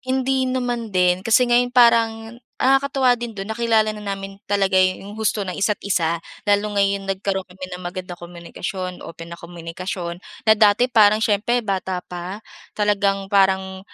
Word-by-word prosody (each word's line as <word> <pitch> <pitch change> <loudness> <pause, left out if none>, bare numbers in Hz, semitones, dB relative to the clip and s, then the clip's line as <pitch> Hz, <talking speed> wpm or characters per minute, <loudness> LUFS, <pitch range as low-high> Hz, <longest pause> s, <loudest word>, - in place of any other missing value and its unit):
Hindi 260 0 0
naman 245 -3 -2
din 180 0 +3
kasi 225 +5 +4
ngayon 245 0 +3
parang 230 -1 +3 0.2
nakakatuwa 270 -1 +3
din 240 -1 -6
do'n 195 0 -7
nakilala 225 -2 +2
na 210 -1 -5
namin 195 0 -5
talaga 195 -1 +1
yung 185 +3 +1
husto 220 -1 0
na 180 - -4
isa't 205 +1 0
isa. 170 -4 0 0.2
Lalo 205 0 +1
ngayon 200 0 +1
nagkaroon 195 0 -2
kami 185 +1 -9
ng 180 - -6
magandang 180 0 -7
komunikasyon, 175 +1 -6
open 165 0 -10
na 170 - -9
komunikasyon 170 +1 -6 0.2
na 220 - +6
dati 215 +2 +4
parang 215 -1 +5
siyempre 230 +3 +1
bata 190 -2 -2
pa, 180 +2 -6 0.4
talagang 200 -2 0
parang 190 -1 +2
200 Hz, 155 wpm, -21 LUFS, 185-225 Hz, 0.4 s, na